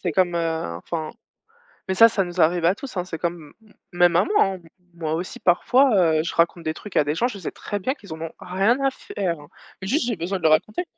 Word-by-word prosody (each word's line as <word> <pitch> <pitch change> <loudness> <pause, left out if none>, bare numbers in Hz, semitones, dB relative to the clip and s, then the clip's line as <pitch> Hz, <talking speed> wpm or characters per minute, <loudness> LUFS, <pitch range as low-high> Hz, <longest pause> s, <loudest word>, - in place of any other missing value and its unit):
c'est 175 - -2
comme, 175 +2 +2
heu, 160 - -2
enfin, 155 - -5 0.8
mais 190 - -1
ça, 230 +4 +8
ça 200 -3 0
nous 175 0 -7
arrive 165 +1 +3
à 180 +3 +4
tous 265 +2 -9
hein, 180 - 0
c'est 170 -3 -6
comme 170 -3 -4
m 215 - -22
m - - -26 0.2
même 175 -1 +5
à 175 - +5
moi 420 - +3
hein, 195 - -1
m 170 -3 -14 0.3
moi 160 -2 -3
aussi 175 +2 -5
parfois, 245 +7 +3 0.2
heu, - - +3
je 165 - -4
raconte 170 0 +1
des 155 0 -2
trucs 210 - -11
à - - +5
des 150 +2 -2
gens, 235 - +1
je 210 -6 -7
sais 175 - -5
très 205 - -5
bien 260 +9 -1
qu'ils 200 - -10
en 160 - -9
ont 165 0 -5
rien 195 +7 +1
à 270 - +3
faire, 185 - -4
hein, 145 - -14 0.3
mais 190 - -5
juste 270 +3 +1
j'ai 235 -3 -1
besoin 180 +3 -3
de - - -13
le 160 - +5
raconter. 215 - +1
175 Hz, 275 wpm, -23 LUFS, 165-205 Hz, 0.8 s, ça